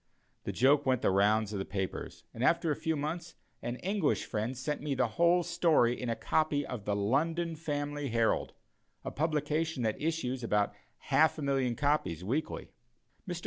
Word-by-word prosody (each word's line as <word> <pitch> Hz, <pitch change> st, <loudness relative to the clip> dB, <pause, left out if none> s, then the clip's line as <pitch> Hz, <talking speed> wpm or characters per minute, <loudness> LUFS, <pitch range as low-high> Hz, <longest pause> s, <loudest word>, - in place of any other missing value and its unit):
The -, -, -1 dB
joke 140 Hz, +3 st, +4 dB
went 130 Hz, -2 st, +2 dB
the -, -, +4 dB
rounds 105 Hz, +2 st, +3 dB
of 100 Hz, -, -2 dB
the -, -, -1 dB
papers; 95 Hz, -1 st, -4 dB
and 115 Hz, -, -4 dB
after 165 Hz, +3 st, +3 dB
a -, -, +1 dB
few 160 Hz, +1 st, -1 dB
months, 160 Hz, +4 st, -4 dB, 0.3 s
an 120 Hz, +1 st, -3 dB
English 195 Hz, -4 st, +1 dB
friend 115 Hz, +3 st, -3 dB
sent 145 Hz, +4 st, -3 dB
me 145 Hz, -2 st, -1 dB
the 125 Hz, -2 st, +1 dB
whole 170 Hz, +9 st, +3 dB
story 165 Hz, -8 st, +2 dB
in 125 Hz, -, -2 dB
a 115 Hz, -, 0 dB
copy 150 Hz, 0 st, +1 dB
of 120 Hz, -6 st, -6 dB
the 100 Hz, -, 0 dB
London 160 Hz, +11 st, 0 dB
Family 145 Hz, -2 st, -3 dB
Herald 115 Hz, -1 st, +1 dB, 0.5 s
a -, -, -3 dB
publication 155 Hz, -1 st, -1 dB
that 110 Hz, -1 st, -1 dB
issues 140 Hz, -6 st, -1 dB
about 105 Hz, -3 st, +1 dB, 0.4 s
half 160 Hz, +1 st, +4 dB
a 155 Hz, -, -4 dB
million 135 Hz, -3 st, +1 dB
of -, -, -10 dB
copies 140 Hz, -, 0 dB
weekly. 135 Hz, +11 st, -3 dB, 0.6 s
Mr. 175 Hz, -1 st, -3 dB
140 Hz, 185 wpm, -31 LUFS, 115-160 Hz, 0.6 s, joke